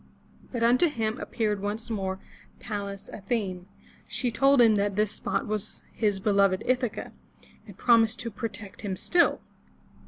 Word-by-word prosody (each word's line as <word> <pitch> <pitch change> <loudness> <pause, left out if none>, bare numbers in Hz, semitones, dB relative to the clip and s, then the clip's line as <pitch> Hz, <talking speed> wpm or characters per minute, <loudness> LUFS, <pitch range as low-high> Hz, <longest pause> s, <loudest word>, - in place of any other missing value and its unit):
But 240 -2 -2
unto 250 +8 +5
him 225 -5 -2
appeared 210 -4 -1
once 215 +3 -4
more 190 -3 -2 0.4
Pallas 200 -3 -5
Athene. 195 -4 -3 0.4
She 245 -2 -1
told 275 +3 +4
him 230 -2 +7
that 200 -1 +1
this 210 0 +1
spot - - -2
was 215 0 -3
his 205 -3 +1
beloved 195 -2 +3
Ith'a 250 -2 +1
ca, - - -7 0.6
and - - -12
promised 230 -3 +4
to 230 - -4
protect 205 -2 -7
him 195 -3 -3
still. 345 - +2
215 Hz, 150 wpm, -27 LUFS, 200-235 Hz, 0.6 s, him